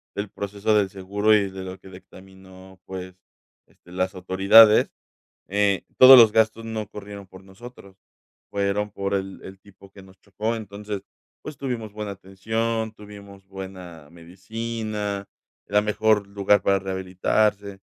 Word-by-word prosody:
del 100 0 -4
proceso 100 +2 -2
del 100 -2 +2
seguro 100 +2 0
y 100 -2 +1
de 95 0 -8
lo 95 0 -8
que - - -16
dictaminó, 95 0 -16
pues, 95 -1 -8 0.5
este, 90 - -22
las 95 +1 -2
autoridades, 95 +4 +5 0.6
eh, 100 -1 +1 0.2
todos 130 +1 +11
los 115 -3 +8
gastos 110 +1 +1
no 110 -1 -4
corrieron 100 -1 -10
por 95 0 -15
nosotros, 100 0 -14 0.5
fueron 100 +1 -1
por 100 0 -3
el 95 0 -4
el 95 0 -11
tipo 100 -1 -19
que 100 0 -15
nos 95 0 -19
chocó. 110 +3 -4
Entonces, 105 -1 -7 0.4
pues, 155 - -8
tuvimos 120 -6 -5
buena 105 -1 -6
atención, 110 +4 -3
tuvimos 100 -2 -14
buena 95 -5 -10
medicina, 105 +4 -5 0.4
era 105 +1 +2
mejor 105 -1 +1
lugar 100 0 +1
para 100 +1 +2
rehabilitarse, 95 +2 -1
100 Hz, 140 wpm, -23 LUFS, 95-105 Hz, 0.6 s, todos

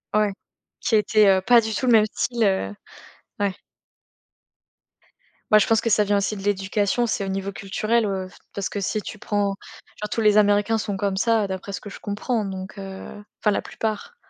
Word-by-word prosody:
Ouais, 210 -1 +3 0.5
qui 225 - +1
était, 215 0 +4
heu, - - -8
pas 235 +4 +6
du 220 -1 -2
tout 255 - -1
le - - +5
même 215 -1 +6
style, 240 -2 0
heu 190 - +1 0.6
ouais. 200 -2 0 1.9
Bah, 215 - +8
je - - +2
pense 225 -1 +3
que 230 - 0
ça 210 0 +4
vient 205 0 +2
aussi 200 +2 -1
de - - -7
l'éducation 205 +3 +1
c'est 215 -3 -1
au - - -5
niveau 195 +1 -3
culturel, 215 +4 0
heu, 190 -2 -2
f - - -18 0.2
parce 200 -1 -3
que 205 - -4
si 210 +2 -1
tu 215 - -8
prends, 205 -1 0 0.5
genre 210 - -3
tous 225 - -1
les 210 -1 +5
américains 205 +2 +4
sont 205 -2 -3
comme 195 -1 -1
ça, 225 +1 +2
heu, - - -2
d'après 190 +1 -5
ce - - -5
que 205 - -8
je - - -10
comprends 210 +2 -2
donc, 190 +1 -7
heu, 195 +1 -8 0.2
enfin 210 - +3
la 200 - 0
plupart. 220 - -4
205 Hz, 210 wpm, -23 LUFS, 195-215 Hz, 1.9 s, Bah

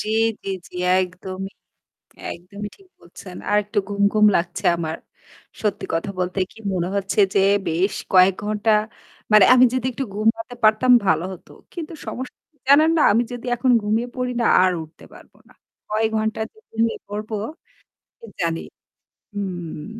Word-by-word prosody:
জ্বি, 215 - -3 0.3
জ্বি, 195 - -4 0.2
জ্বি। - - -12 0.2
একদমই 185 +1 -5 0.8
একদমই 200 +4 -8
ঠিক 390 -1 -22
বলছেন। 180 +1 -12
আরেকটু 210 0 +1
ঘুমঘুম 200 +1 +3
লাগছে 175 +1 -2
আমার। 160 -1 -3 0.6
সত্যি 210 -2 -1
কথা 165 +4 -1
বলতে 180 +2 -1
কি - - -19 0.2
মনে 175 -1 -1
হচ্ছে 200 +1 -1
যে 200 - +3 0.3
বেশ 175 +5 0 0.2
কয়েক 185 0 +6
ঘন্টা 215 +1 +1 0.6
মানে 210 -3 +8
আমি 255 0 +7
যদি 255 -1 -1
একটু 265 +2 -4
ঘুমাতে 225 +3 0
পারতাম 215 +4 +4
ভালো 160 -2 +2
হতো। 180 - -14 0.2
কিন্তু 335 -1 -6
সমস্যা 255 +1 -6 0.3
জানেন 305 +3 +7
না - - +3
আমি 230 +4 +3
যদি 245 0 -7
এখন 250 +1 +2
ঘুমিয়ে 220 +3 0
পড়ি 250 -1 -2
না - - +1 0.2
আর 185 - +3
উঠতে 160 +1 -16
পারব - - -16 0.2
না। - - -20 0.4
কয় 215 +1 +1
ঘন্টা 220 0 -1
যে - - -32
ঘুমিয়ে 225 0 0
পড়বো 210 +2 -5 0.8
কি - - -12
জানি। 165 -1 0 0.7
হুম। 175 -6 -5
210 Hz, 155 wpm, -22 LUFS, 185-225 Hz, 0.8 s, মানে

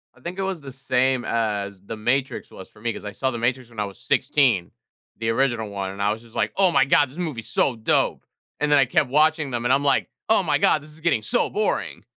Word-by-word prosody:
I - - -21
think 180 +3 -6
it - - 0
was 190 -4 -3
the 135 -1 -9
same 130 -1 0
as 100 -4 -2
The 110 +3 -7
Matrix 130 +5 -1
was 95 - -11
for 105 - -20
me 115 0 -1
'cause - - -9
I 105 - -4
saw 130 +6 -1
The 120 - -4
Matrix 120 +1 -1
when 115 -2 -10
I 105 - 0
was 100 -1 -10
16, 130 -10 +2 0.5
the 115 0 -2
original 115 -2 0
one, 100 -1 -4
and 100 +1 -7
I 100 +1 +2
was 110 +1 -4
just 115 -1 -18
like, - - 0
"Oh 190 -2 +5
my 135 - +4
God! 145 0 +4
This 140 - -15
movie 155 -10 -3
is - - -11
so 130 - +1
dope!" 110 - +1 0.3
And 150 0 0
then 145 - +6
I 135 - +5
kept 130 +2 +1
watching 155 +1 +2
them 120 -1 -3
and - - +3
I'm 140 - +2
like, 140 -2 +2 0.2
"Oh 220 -3 +4
my 150 -4 +2
God! 150 - +3
This 150 +1 -14
is 155 +1 -15
getting 165 -9 +1
so 110 - +1
boring!" - - -2
130 Hz, 265 wpm, -23 LUFS, 110-145 Hz, 0.5 s, then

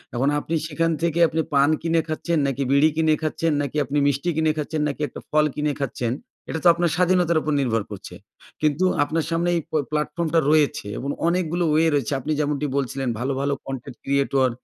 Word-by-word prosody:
এখন 135 +4 +2
আপনি 165 +2 -3
সেখান 165 +2 0
থেকে 170 0 0
আপনি 160 +1 -1
পান 140 +1 +4
কিনে 165 0 +2
খাচ্ছেন, 160 +1 -1
নাকি 135 0 -1
বিড়ি 140 +3 +5
কিনে 160 -1 +3
খাচ্ছেন, 160 +1 0
নাকি 145 +1 -3
আপনি 140 +3 -2
মিষ্টি 145 +5 0
কিনে 160 -1 +2
খাচ্ছেন, 155 0 -2
নাকি 145 +1 -4
একটা - - -9
ফল 150 0 +3
কিনে 150 0 0
খাচ্ছেন, 120 -3 -2 0.4
এটা 160 - -2
তো - - +5
আপনার 170 0 +1
স্বাধীনতার 180 -2 +3
উপর 150 - -1
নির্ভর 115 -5 0
করছে। 100 - -8 0.5
কিন্তু 155 +4 +2 0.2
আপনার 155 +2 -1
সামনে 170 +1 +1
এই 170 - 0
প - - -28 0.2
প্ল্যাটফর্মটা 155 +2 0
রয়েছে 150 -9 +2
এবং 140 - -4 0.2
অনেকগুলো 175 0 0
ওয়ে 160 +1 +4
রয়েছে। 140 -3 0
আপনি 145 +4 -4
যেমনটি 150 -1 0
বলছিলেন 135 -1 -2
ভালো, 130 +3 -1
ভালো 140 0 0
কন্টেন্ট 135 -2 -6
ক্রিয়েটর, 135 -1 +2
150 Hz, 195 wpm, -23 LUFS, 140-165 Hz, 0.5 s, বিড়ি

